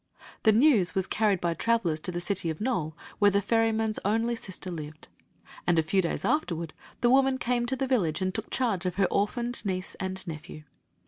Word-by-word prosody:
The 220 - +5
news 220 - +4
was 190 -1 +2
carried 210 -2 +1
by 170 -1 0
travelers 185 -6 +1
to 180 - -5
the 175 - -3
city 175 -1 -2
of 160 - -4
Nole, 185 -10 -2 0.2
where 205 - +6
the 200 0 +2
ferryman's 225 +1 +1
only 225 +4 +1
sister 190 -4 -5
lived; 155 -2 -8 0.6
and 175 -1 +3
a 160 - +4
few 190 +4 +2
days 170 - -2
afterward 170 - -1 0.3
the 240 - +4
woman 265 0 +4
came 240 -1 0
to 265 - 0
the 270 +1 -1
village 200 - +1
and 185 -1 -1
took 220 +1 -4
charge 205 -8 0
of 180 - -2
her 200 - +3
orphaned 240 +4 -1
niece 185 -2 -2
and 190 0 -4
nephew. 155 -2 -8
200 Hz, 200 wpm, -28 LUFS, 175-230 Hz, 0.6 s, where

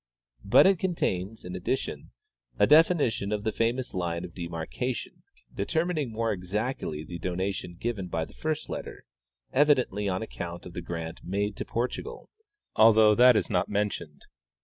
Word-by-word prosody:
But - - +6
it 190 -2 +4
contains, 110 - -2
in 90 0 -6
addition, 90 +9 -3 0.5
a - - +5
definition 150 - +4
of 105 -1 -1
the 110 - 0
famous 120 +3 -1
line 85 -1 -2
of 85 - -11
de 85 -2 -5
marcation, 85 +10 -4 0.3
determining 160 -6 -1
more 115 0 -1
exactly 95 - -3
the 85 +2 -7
donation 90 +1 -3
given 105 -1 -3
by 80 -2 -2
the - - -17
first 155 -1 -3
letter, - - -7 0.5
evidently 130 -8 +3
on 95 +2 -1
account 85 -5 -7
of 90 - -9
the 90 - -5
grant 85 -1 -5
made 100 +2 -2
to - - -4
Por 120 +2 0
tugal, 455 - -8 0.5
although 110 -1 +7
that 125 +2 +7
is 105 - +1
not 90 -3 +1
mentioned. 100 -7 -3
105 Hz, 160 wpm, -28 LUFS, 90-125 Hz, 0.5 s, although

